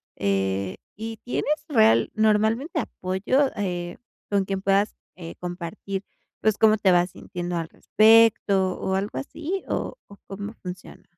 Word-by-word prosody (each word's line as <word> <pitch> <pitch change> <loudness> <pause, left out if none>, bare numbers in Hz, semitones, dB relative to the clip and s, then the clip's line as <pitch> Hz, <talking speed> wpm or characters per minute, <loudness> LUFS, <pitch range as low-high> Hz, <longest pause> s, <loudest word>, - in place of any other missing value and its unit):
eh, 95 -1 -1 0.2
y 225 +1 -6
¿tienes 265 +6 -1
real 220 -7 +4
normalmente 220 - +2
apoyo, 225 +8 0
eh, 175 -3 -3 0.3
con 200 -1 +2
quien 195 0 -3
puedas, 200 +2 +2 0.2
eh, 170 -2 -8
compartir 180 +2 -5 0.4
pues, 215 -1 +2
cómo 220 -1 +5
te 195 -3 +3
vas 175 0 +3
sintiendo 175 -1 -5
al 165 -1 -3
respecto, 215 -4 +4
o 190 - -2
algo 195 -7 -2
así? 320 - -4
¿O - - -3
o 200 - -14
cómo 200 +2 -6
funciona? 180 0 -9
195 Hz, 140 wpm, -24 LUFS, 180-220 Hz, 0.4 s, cómo